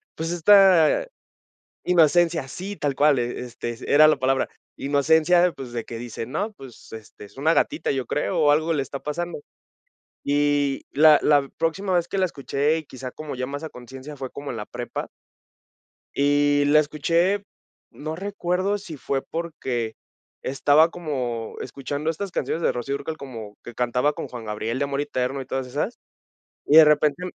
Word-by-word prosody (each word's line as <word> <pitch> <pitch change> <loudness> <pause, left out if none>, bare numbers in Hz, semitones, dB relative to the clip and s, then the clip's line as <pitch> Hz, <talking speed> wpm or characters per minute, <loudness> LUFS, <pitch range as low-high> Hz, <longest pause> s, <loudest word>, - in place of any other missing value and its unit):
pues, 165 +1 -3
esta 190 - +5 0.8
inocencia, 165 -3 +3
sí, 195 +7 -7
tal 140 -2 -1
cual, 145 -3 +4
este, 120 0 -4
s 115 - -10
era 155 +2 +8
la 155 - +4
palabra, 135 0 +1 0.3
inocencia, 160 +5 +3
pues, 130 -5 -9
de 115 -2 -3
que 115 - -8
dice: 115 -1 -6
"No, 200 - -3
pues, 130 - -14
este, 110 -1 -11
es 100 - -18
una 155 +4 +2
gatita, 305 - 0
yo 135 -2 -2
creo, 165 +4 -1
o 150 -2 +5
algo 155 +2 +2
le 150 -4 +1
está 135 +1 -6
pasando". 170 +4 -4 0.9
Y 145 -1 +1
la 155 +1 +6
la 145 -2 +3
próxima 185 +4 -1
vez 175 -1 +1
que 195 - -3
la 190 - +3
escuché, 150 -1 -1
y 160 - -9
quizá 130 -2 -8
como 155 +1 -7
ya 125 - -3
más 145 +3 -6
a 160 - -5
conciencia, 130 +4 -10
fue 130 -1 -5
como 140 +1 -7
en 115 - -6
la 105 - -5
prepa. - - -6 1.1
Y 145 0 +3
la 150 +2 +5
escuché, 165 +7 0 0.5
no 155 +2 -6
recuerdo 195 +1 -1
si 180 -6 -9
fue 135 0 -2
porque 130 -9 -4 0.5
estaba 145 +4 +3
como 125 -10 -4
escuchando 140 +4 -3
estas 190 +3 -5
canciones 165 - -2
de - - +2
Rocío 125 +3 -3
Dúrcal, 155 +2 -5
como 115 -7 -9
que 120 - -10
cantaba 125 +4 +1
con - - -6
Juan 120 -2 -8
Gabriel 110 +3 -3
de 140 - 0
Amor 140 0 -2
Eterno 135 -2 -2
y 130 - -7
todas 130 -1 -3
esas, 150 - -3 0.7
y 150 - +5
de 160 - +10
repente 150 +2 +2
145 Hz, 175 wpm, -24 LUFS, 130-165 Hz, 1.1 s, de